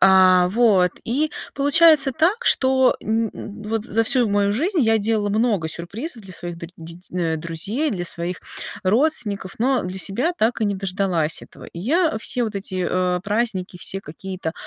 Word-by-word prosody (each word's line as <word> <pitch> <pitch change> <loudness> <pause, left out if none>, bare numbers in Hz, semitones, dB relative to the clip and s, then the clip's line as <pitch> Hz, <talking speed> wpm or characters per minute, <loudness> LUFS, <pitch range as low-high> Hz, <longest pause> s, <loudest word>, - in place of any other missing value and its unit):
А 185 -1 +6
вот. 200 -5 +3
И 290 +6 0 0.2
получается 285 0 +5
так, 375 - +1
что 260 -1 +4
н 225 0 0
н 210 +1 -9
вот 220 0 -2
за 225 -1 0
всю 245 -1 +3
мою 200 0 +1
жизнь 330 - -1
я 225 -3 +4
делала 215 -1 0
много 215 -5 +1
сюрпризов 220 - -6
для 190 -2 -9
своих 175 -1 -5
дру 170 0 -8
деть 170 +2 -10
э, 170 -3 -1
друзей, 170 - -2
для 180 -5 -3
своих 175 +1 -4 0.4
родственников, 210 - 0
но, 255 +2 +2
э, - - -6
для 185 +1 -5
себя 240 - 0
так 225 +1 +1
и - - +2
не 205 -1 0
дождалась 185 -4 -1
этого. - - -14
И 170 - -9
я, 320 - +1
э, - - -2
все 245 +2 0
вот 220 -2 -5
эти, 190 -2 -3
э, 180 -1 0
праздники, 205 -4 -1
все 195 +2 0
какие-то, 185 0 -6
205 Hz, 185 wpm, -21 LUFS, 185-245 Hz, 0.4 s, А